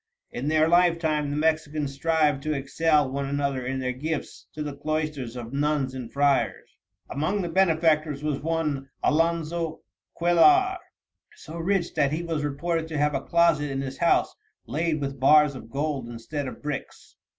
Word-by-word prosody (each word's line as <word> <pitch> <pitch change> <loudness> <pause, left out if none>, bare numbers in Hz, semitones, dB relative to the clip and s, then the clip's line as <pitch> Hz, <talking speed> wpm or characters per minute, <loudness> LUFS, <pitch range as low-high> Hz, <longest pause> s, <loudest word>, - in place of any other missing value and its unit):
In 130 +4 -4
their 155 +1 +3
lifetime 165 -4 +2
the 145 - -2
Mexicans 155 -2 0
strive 150 -1 +1
to 155 +1 -1
excel 150 +2 +2
one 140 0 -2
another 140 -2 -1
in 130 +1 -2
their 130 -1 -1
gifts 150 +4 -5
to 155 - -4
the 145 -2 -5
cloisters 150 -5 -3
of 120 0 -7
nuns 145 -2 0
and 125 -3 -7
friars." 140 -1 0 0.3
"Among 185 +8 -1
the 175 - -3
benefactors 160 -5 +2
was 150 -2 -1
one, 150 -4 -2
Alonzo 165 +1 0 0.4
Cuellar, 365 - +5 0.6
so 160 - -11
rich 180 0 0
that 140 -2 +2
he 160 +3 -2
was 165 -3 -2
reported 160 +3 -2
to 160 -2 -4
have 150 0 +2
a - - -1
closet 170 -4 +2
in 135 0 -2
his 135 0 -6
house 170 - +2 0.3
laid 160 0 -1
with 135 -1 -4
bars 150 +2 +5
of 120 -4 -10
gold 140 -2 -2
instead 130 +5 -5
of 130 - -9
bricks. 150 -2 -6
150 Hz, 165 wpm, -26 LUFS, 140-165 Hz, 0.6 s, Cuellar